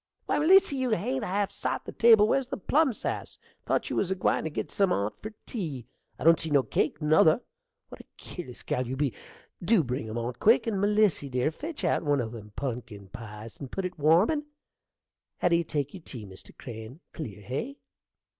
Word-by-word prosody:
Why, - - +1
Melissy, 325 -2 +5
you 260 -1 0
hain't 240 +5 -1
half 200 0 -1
sot - - -3
the - - -6
table: 225 -3 +6
where's 270 +2 +1
the - - -4
plum 290 - +2
sass? 220 - -5 0.3
thought - - 0
you - - -1
was 190 - +1
a 190 - 0
gwine 180 - +1
to - - -1
git 150 - -4
some 195 -2 +2
on't 100 - -1
for 215 - -6
tea? 155 - -5 0.3
I - - -7
don't 165 +1 +6
see 160 - -4
no 140 -3 +4
cake, 150 +2 -1
nother. 155 +4 +5 0.5
What - - -10
a - - -21
keerless 160 -9 -9
gal 125 -1 -1
you 130 - -3
be! 140 -2 0 0.5
Dew 200 -1 +4
bring 125 -3 -3
'em 110 - -4
on 120 +2 -2
quick; - - +5
and, 205 -4 -1
Melissy, 205 -8 +2
dear, 125 +4 0
fetch 300 - -7
out - - +2
one 145 -3 +1
o' 115 -3 -2
them 110 -2 -9
are 105 - -10
punkin 115 -7 -5
pies 110 +1 -9
and 135 -3 -8
put 195 - -3
it 180 -3 -5
warmin'. 180 - +4 0.9
How 175 - +2
do 170 - +4
you 170 - +2
take 145 -3 -3
your 190 - -9
tea, 120 -8 -8
Mr. 95 -1 -13
Crane? 115 +3 -9
clear, 105 -10 -7
hey? 185 - -4
155 Hz, 210 wpm, -28 LUFS, 125-210 Hz, 0.9 s, table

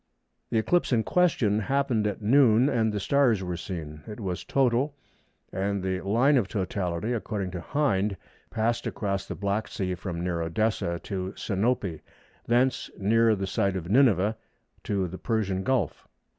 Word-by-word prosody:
The 115 - 0
eclipse 175 +11 +2
in 115 -3 +3
question 125 - +2
happened 130 -2 +1
at 105 +1 -4
noon, 125 +1 +5
and 115 -5 +1
the 105 - -2
stars 120 -3 +2
were 90 -1 -3
seen. 80 -4 -6
It 105 0 -7
was 95 -4 -3
total, 135 +2 +1 0.6
and 100 0 -1
the 95 0 -1
line 120 +9 +3
of 110 -6 +1
totality, 95 +1 -2
according 105 -5 -3
to 90 -1 -5
Hind, 105 - 0 0.3
passed 115 +1 -1
across 100 -3 -2
the - - -5
Black 100 +2 -1
Sea 95 -5 -3
from 90 -2 -5
near 85 -2 -1
Odessa 85 0 -1
to 95 -1 -4
Sinope, 100 -4 -1 0.5
thence 125 +2 +2
near 110 +2 +3
the 95 -1 -3
site 95 0 0
of 90 0 -4
Nineveh 110 -4 +4 0.5
to 95 -3 0
the 95 +2 -8
Persian 100 -5 -1
Gulf. 110 - -1
105 Hz, 155 wpm, -27 LUFS, 95-120 Hz, 0.6 s, noon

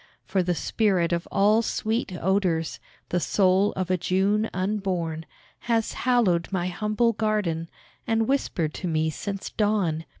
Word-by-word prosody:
For 190 0 +1
the 180 0 0
spirit 185 -3 +1
of 170 0 -2
all 210 +3 +4
sweet 220 -1 -1
odours 180 -4 0 0.3
The 180 - +1
soul 190 +5 +3
of 185 -1 -2
a 185 - +3
June 200 +5 +1
unborn 185 -5 -2 0.4
Has 225 -1 +1
hallowed 210 -10 +1
my 180 -2 -1
humble 215 +5 +1
garden, 200 -7 -1 0.4
And 225 0 +1
whispered 175 - 0
to 185 - -4
me 160 -1 +1
since 195 +4 -5
dawn. 195 -7 0
190 Hz, 140 wpm, -25 LUFS, 170-215 Hz, 0.4 s, all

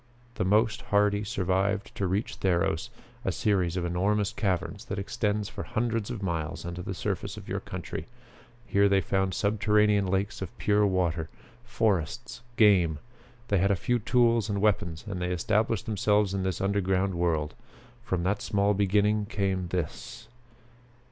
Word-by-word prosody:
The - - -2
most 105 +3 +2
hardy 105 0 +2
survived 95 0 -1
to 100 - -1
reach 100 +5 -2
Theros, 85 -3 +1 0.3
a - - 0
series 95 -4 +1
of 90 - -1
enormous 100 +4 0
caverns 100 +1 -2
that 100 - -4
extends 105 +1 -1
for - - -7
hundreds 115 -1 -1
of 115 -5 -5
miles 80 -4 -3
under 85 0 -5
the - - -5
surface - - -3
of - - -10
your - - -2
country. - - -6 0.6
Here 100 -3 +3
they 100 0 +4
found 95 0 0
subterranean 105 -1 +2
lakes 95 +3 -1
of 95 - -6
pure 105 0 +3
water; 85 -4 0 0.3
forests, 115 -1 -1 0.2
game. 90 -8 +5 0.5
They 100 - +3
had 100 +2 +3
a 100 - +3
few 120 +7 0
tools 115 -1 +2
and 100 -1 -1
weapons 100 -5 0
and 95 -3 -4
they 90 - -1
established 110 +5 0
themselves 105 -2 +2
in 100 - -1
this 95 -1 -2
underground 95 -1 +1
world. 80 -3 0 0.5
From 95 -6 -1
that 100 +3 0
small 100 0 +1
beginning 105 +1 +2
came 95 -4 -1
this!" 85 -3 -5
100 Hz, 155 wpm, -28 LUFS, 90-105 Hz, 0.6 s, game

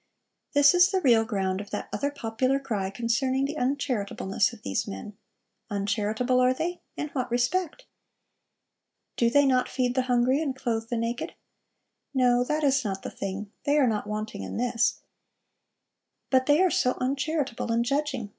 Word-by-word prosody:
This 285 +1 +6
is 360 +1 +6
the 385 -2 +1
real 235 -9 +4
ground 195 -4 -1
of 205 - -10
that - - -4
other 285 - 0
popular 260 0 -1
cry 215 -8 -2
concerning 255 +5 0
'the 295 +2 -4
uncharitableness 250 -6 0
of 230 -3 -14
these 95 - -2
men.' 95 - -7 0.5
Uncharitable, 215 +4 0
are 255 0 +3
they? 350 +5 -3 0.2
In 300 - -3
what 255 -4 -3
respect? 315 - -1 1.3
Do 235 - +3
they 285 +4 +4
not 255 -2 +2
feed 250 -2 0
the 260 - +2
hungry 250 +4 +3
and 280 -5 -2
clothe 230 -3 -2
the 240 - -1
naked? 230 +1 -3 0.8
'No; 245 -1 +4
that 300 +4 -1
is 275 -1 +3
not 195 -3 -4
the - - -5
thing: 200 +1 -5
they 290 +1 +2
are 285 - +5
not 215 -3 -1
wanting 215 +1 -4
in - - -5
this: 235 -1 +1 1.3
but 260 -1 +3
they 295 +5 +5
are 370 - +3
so 250 -3 +1
uncharitable 275 -2 -1
in 230 +1 +2
judging! 265 -4 -1
250 Hz, 165 wpm, -27 LUFS, 225-280 Hz, 1.3 s, This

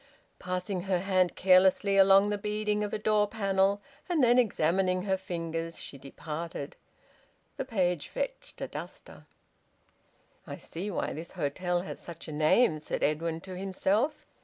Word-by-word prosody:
Passing 185 +1 -3
her 190 -2 +1
hand 185 -1 +1
carelessly 190 +2 +4
along 195 +1 +6
the 205 - 0
beading 210 0 -1
of 205 - -3
a - - -1
door 210 0 +2
panel 200 -1 +1 0.3
and 330 -6 +2
then 245 +1 +5
examining 185 -3 +1
her 195 -1 +1
fingers, 165 -3 -4
she 140 - -7
departed. 150 +2 -6 0.8
The - - -3
page 180 - 0
fetched - - -5
a - - -2
duster. - - -9 1.2
"I - - -6
see 185 +5 -5
why 190 - -2
this 160 +3 -8
hotel 175 +2 -1
has 190 - -6
such 170 -1 -9
a - - -6
name," 155 +4 +3
said 150 - -4
Edwin 160 +2 0
to 185 +1 -8
himself. 195 +9 0
190 Hz, 150 wpm, -29 LUFS, 170-205 Hz, 1.2 s, along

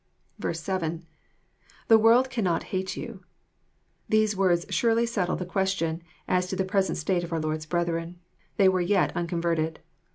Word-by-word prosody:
7. 170 -1 -3 0.4
— - - -31
[The 225 -1 +7
world 240 +4 +5
cannot 190 -9 0
hate 190 0 -2
you,} 220 -6 -7 0.9
These 215 -1 +3
words 180 -3 +2
surely 230 0 +2
settle 200 -6 -1
the 180 - -4
question 180 -3 -1 0.3
as 180 0 +1
to 190 - -3
the 190 - 0
present 190 0 0
state 175 +2 0
of 170 - -7
our 165 - 0
Lord's 155 0 -3
brethren. 170 0 -2 0.4
They 195 - +5
were 185 -1 +3
yet 195 +3 +1
unconverted. 170 -2 -1
180 Hz, 155 wpm, -26 LUFS, 170-200 Hz, 0.9 s, The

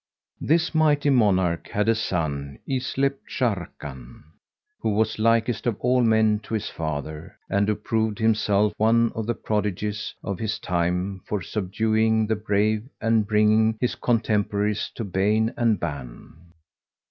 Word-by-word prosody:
This 165 +3 +1
mighty 150 -2 +3
monarch 95 -9 +2
had 105 +1 -1
a 115 - +5
son 75 -10 -2
yclept 135 +1 -1
Sharrkan,[FN#143] 75 - -4 0.6
who - - -1
was 110 0 0
likest 115 +1 +2
of 115 -4 -1
all 125 +1 +2
men 110 -2 +3
to 110 - -5
his 110 - -2
father 80 0 -5
and 100 +1 +1
who 105 - +1
proved 110 -1 -1
himself 105 -2 +2
one 115 +1 +3
of 110 -1 -4
the 120 - 0
prodigies 105 0 -2
of 100 -3 -4
his 110 -2 -2
time 90 +1 -1
for 105 - -1
subduing 110 +3 +1
the 110 +1 0
brave 105 +2 0
and 115 -2 +2
bringing 110 +1 +3
his 125 - 0
contemporaries 105 -3 0
to 115 - -4
bane 105 +3 +1
and 115 -5 +2
ban. 70 -7 -6
110 Hz, 140 wpm, -24 LUFS, 100-115 Hz, 0.6 s, a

